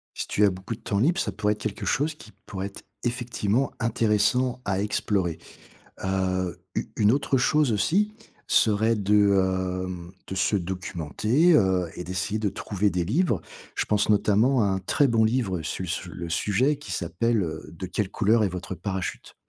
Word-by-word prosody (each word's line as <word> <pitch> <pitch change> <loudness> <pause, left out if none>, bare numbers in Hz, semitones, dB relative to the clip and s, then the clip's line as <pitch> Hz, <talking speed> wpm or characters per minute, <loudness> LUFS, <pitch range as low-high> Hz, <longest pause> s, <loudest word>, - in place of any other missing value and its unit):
Si - - -3
tu 105 - +2
as 100 - +5
beaucoup 95 +5 -5
de - - -14
temps 100 - -1
libre, 165 - +2
ça - - -1
pourrait 105 0 0
être 105 - -13
quelque - - -4
chose 150 +5 +1
qui 110 -8 -15
pourrait 95 0 -4
être 100 - -10 0.2
effectivement 120 0 0
intéressant, 115 +2 +1
à 100 -1 0
explorer. 100 -4 -1 0.7
Heu, 95 -2 -1 0.2
u - - -1
une 105 -2 +4
autre 140 0 +1
chose 140 +1 +3
aussi, 195 - +1 0.3
serait 110 +1 +3
de, 95 -3 +2
hem, 90 -1 -7 0.2
de - - -4
se 95 +2 +1
documenter, 95 - +1
heu, 95 - +3
et 90 - -5
d'essayer 95 +4 -2
de 105 -1 0
trouver 100 +1 -1
des 90 -2 -1
livres. 115 - +1 0.3
Je - - 0
pense 105 -1 +1
notamment 110 +4 +3
à - - +3
un 95 -1 +1
très 135 +9 +2
bon 115 -2 +3
livre 110 -7 0
su 80 +4 -4
sur 85 +1 -4
le 85 +1 -6
sujet 105 - +1
qui 145 - -8
s'appelle, 105 +6 0
heu: 80 -3 -5
«De 90 +3 -6
quelle 95 +2 -2
couleur 110 +2 +3
est - - +2
votre 90 +1 -5
parachute?» 95 -2 -4
105 Hz, 180 wpm, -26 LUFS, 95-115 Hz, 0.7 s, as